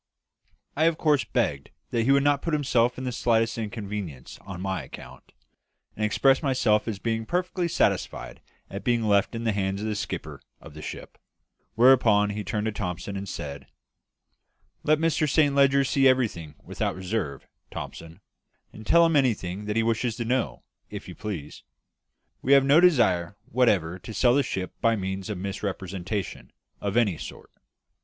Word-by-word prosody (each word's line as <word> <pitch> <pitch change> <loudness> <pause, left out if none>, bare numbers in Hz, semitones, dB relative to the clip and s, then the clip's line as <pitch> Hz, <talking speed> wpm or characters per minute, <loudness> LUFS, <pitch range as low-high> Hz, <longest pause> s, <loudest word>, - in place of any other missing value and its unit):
I 155 - +2
of 165 -1 +2
course 150 -4 +2
begged 85 - -1 0.2
that 115 -1 +1
he 135 - +4
would 140 0 +4
not 145 -1 +2
put 165 -2 0
himself 125 -4 +2
to - - -7
the 130 -1 -2
slightest 115 -1 +1
inconvenience 105 - -6
on 95 -3 -8
my 95 0 -2
account, - - -12 0.6
and 110 - -3
expressed 135 +5 +3
myself 125 -7 +2
as 110 -3 -2
being 115 +2 -2
perfectly 180 - -1
satisfied 165 - -1 0.3
at 100 - -7
being 120 -2 +1
left 100 +1 +2
in 115 - -4
the 115 - +1
hands 100 -1 -1
of 105 - -4
the 110 - -1
skipper - - -5 0.2
of 80 - -13
the 75 - -10
ship; - - -8 0.6
whereupon 115 -4 +5
he 105 0 -4
turned 105 +2 -2
to 110 - 0
Thomson 100 -1 -4
and 100 0 -5
said 70 -2 -6 1.1
"Let 155 +1 +3
Mr 160 -1 +1
Saint 145 0 +3
Leger 140 0 +4
see 135 0 +3
everything 110 - 0
without - - -3
reserve, 95 - -3 0.2
Thomson; 80 0 -8 0.5
and 110 - -11
tell 170 0 +6
him 165 -1 +2
anything 105 -7 0
he 110 +2 +1
wishes 115 0 0
to 120 - -4
know, 125 +1 -1 0.3
if - - -8
you - - -8
please. 85 -9 -6 0.8
We 135 - +3
have 140 -1 +6
no 140 +3 +6
desire 100 - +3
whatever 100 -8 +1
to 110 +4 -9
sell 120 -1 +4
the 140 - +4
ship 95 -8 -4
by 115 0 +3
means 95 0 -4
of 105 - -3
misrepresentation 95 0 -4 0.3
of 100 +2 -2
any 105 -9 +2
sort. - - -9
110 Hz, 170 wpm, -26 LUFS, 95-130 Hz, 1.1 s, tell